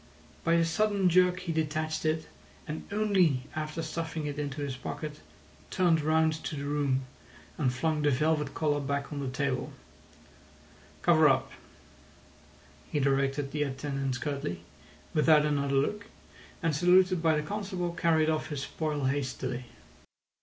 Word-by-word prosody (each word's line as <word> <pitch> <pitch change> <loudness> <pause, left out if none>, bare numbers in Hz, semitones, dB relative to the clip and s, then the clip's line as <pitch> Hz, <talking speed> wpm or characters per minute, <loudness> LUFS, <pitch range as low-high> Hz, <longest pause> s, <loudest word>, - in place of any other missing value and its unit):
By 165 - +2
a 165 0 +4
sudden 200 +2 +2
jerk 180 +1 +4
he 180 -2 -3
detached 155 0 -1
it, 155 0 0 0.4
and 155 +5 -6
only 190 -10 +2
after 155 +1 -3
stuffing 160 -1 -4
it 145 0 -4
into 145 0 -3
his 140 -2 -3
pocket 150 +3 -6 0.5
turned 170 -4 +3
round 160 +1 +3
to - - -3
the 140 0 -4
room, 140 -2 0 0.5
and 135 -5 +1
flung 150 +5 0
the 150 - +3
velvet 150 +1 +1
collar 150 -2 +1
back 140 +1 -3
on 145 - -4
the 135 -2 -2
table— 130 0 -2 1.3
"Cover 160 -3 +6
up," 130 -1 +1 1.4
he 150 - +1
directed 135 0 +1
the 150 - -2
attendants 135 -1 -2
curtly, 135 - -3 0.5
without 155 0 +5
another 140 -2 0
look, 205 +10 0 0.6
and, 165 -3 +1
saluted 180 +2 +4
by 160 -1 +3
the 150 - 0
constable, 190 -3 -3
carried 160 -2 +2
off 155 -1 0
his 145 -3 -3
spoil 150 -2 -3
hastily. 130 -2 -2
150 Hz, 145 wpm, -29 LUFS, 140-165 Hz, 1.4 s, Cover